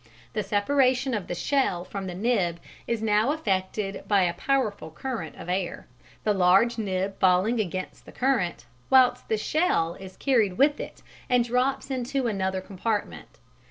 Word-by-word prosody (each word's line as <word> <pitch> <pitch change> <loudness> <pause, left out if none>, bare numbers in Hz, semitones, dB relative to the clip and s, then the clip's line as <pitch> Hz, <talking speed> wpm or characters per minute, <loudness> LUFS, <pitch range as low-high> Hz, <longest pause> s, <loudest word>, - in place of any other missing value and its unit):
The 215 - 0
separation 255 +6 +2
of 205 -5 -2
the 175 - -3
shell 180 -4 0
from 195 0 -5
the 180 - -5
nib 190 -5 0 0.3
is 230 -2 -1
now 215 +4 +3
effected 195 -6 -2
by 200 -3 +4
a 175 -1 +1
powerful 215 - -1
current 195 0 -5
of - - -10
air, 180 0 -2 0.4
the 210 - +2
large 195 +5 +4
nib 195 -1 -2
falling 190 +6 +3
against 185 -2 -4
the - - -10
current, 245 -10 0 0.2
whilst 255 -1 +4
the 220 - +2
shell 215 - +1
is 190 +1 -11
carried 220 -9 +2
with 290 +2 +3
it - - -8 0.3
and 245 -1 +4
drops 255 +3 0
into 255 +1 -1
another 190 -4 -1
compartment. 205 +3 -4
210 Hz, 160 wpm, -26 LUFS, 185-250 Hz, 0.4 s, by